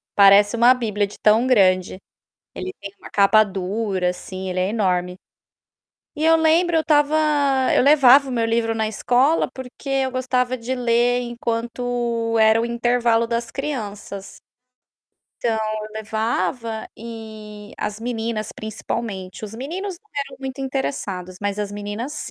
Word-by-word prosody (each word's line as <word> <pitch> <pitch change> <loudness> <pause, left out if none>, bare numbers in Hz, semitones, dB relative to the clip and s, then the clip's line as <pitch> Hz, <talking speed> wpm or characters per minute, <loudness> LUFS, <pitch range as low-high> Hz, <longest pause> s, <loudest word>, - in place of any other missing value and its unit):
Parece 200 +2 +6
uma 240 +2 +6
bíblia 210 -5 -1
de 205 - -12
tão 220 +4 +4
grande. 185 -7 +3 0.6
Ele 375 - -5
tem 200 -1 -8
uma - - -12
capa 205 +2 +5
dura, 190 -1 -2
assim, 185 +1 -7
ele 185 0 -1
é 185 - +1
enorme. 180 -4 0 1.0
E 300 - -3
eu 325 0 +6
lembro, 325 +2 +3
eu 320 - +4
estava 300 -1 +2 0.6
eu - - +4
levava 275 -1 +6
o - - -4
meu 230 -2 0
livro 225 0 0
na 220 -1 0
escola 250 +8 +2
porque 260 +2 -9
eu 270 -1 0
gostava 255 0 0
de 245 +2 -3
ler 245 0 +2
enquanto 235 -1 -2
era 220 +1 +5
o - - -1
intervalo 235 -1 +1
das 235 0 -2
crianças. 210 -8 -6 1.0
Então 230 -2 +1
eu 215 0 -3
levava 220 +1 -2
e, 215 -2 -10
as 210 0 -3
meninas 225 -2 -3
principalmente, 215 -3 -5
os 215 0 -7
meninos 350 - -5
não 430 +3 -36
eram 280 -1 -4
muito 265 0 -6
interessados, 200 -9 -4
mas 205 0 -2
as 205 -1 -3
meninas 205 +8 -5
230 Hz, 145 wpm, -21 LUFS, 210-255 Hz, 1.0 s, Parece